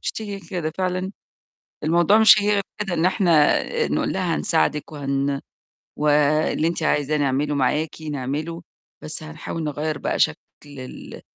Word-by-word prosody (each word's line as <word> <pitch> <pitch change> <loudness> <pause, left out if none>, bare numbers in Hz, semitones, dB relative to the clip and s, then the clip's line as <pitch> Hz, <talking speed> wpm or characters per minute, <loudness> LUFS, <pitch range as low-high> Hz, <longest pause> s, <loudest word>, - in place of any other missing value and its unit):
مش - - -1
هتيجي 215 -2 -6
غير - - -10
كده، 165 -4 -2
فعلًا 185 +1 -1 0.7
الموضوع 170 +6 +4
مش 220 -1 +7
هي 205 0 +2 0.2
فكرة 200 -4 -2
إن 165 0 +1
إحنا 175 -6 +3
نقول - - -1
لها - - 0
هنساعدِك 150 - 0
وهن 140 -1 -2 0.6
واللي 150 +1 +2
أنتِ 170 -1 -3
عايزاه 150 -1 +1
نعمله 145 +1 0
معاكِ 150 +4 -1
نعمله، 150 +5 -4 0.4
بس 155 +1 -6
هنحاول 160 +1 -6
نغيَّر 150 +1 -2
بقى - - -2
شكل - - +3 0.3
ال 130 -3 -10
155 Hz, 145 wpm, -22 LUFS, 145-175 Hz, 0.7 s, مش